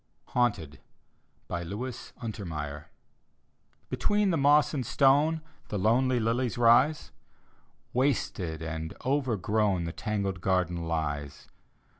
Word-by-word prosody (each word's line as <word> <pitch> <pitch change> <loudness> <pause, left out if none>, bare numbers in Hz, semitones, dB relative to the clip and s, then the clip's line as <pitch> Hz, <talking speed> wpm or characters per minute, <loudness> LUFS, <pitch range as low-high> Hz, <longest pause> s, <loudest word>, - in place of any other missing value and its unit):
HAUNTED: 105 - 0 0.7
look 100 +9 -4 0.3
untermeyer 75 -9 -5 1.1
Between 205 -2 +1
the 165 - +1
moss 145 +1 +4
and 135 -4 -1
stone 145 +6 +3 0.3
The 105 - -3
lonely 120 +5 +2
lilies 120 +2 0
rise; 120 +6 +4 0.8
Wasted 100 - -1
and 80 0 -5
overgrown 110 -8 +1
The 85 0 -4
tangled 100 -4 -2
garden 90 -3 0
lies. 75 -3 -3
110 Hz, 95 wpm, -28 LUFS, 85-130 Hz, 1.1 s, moss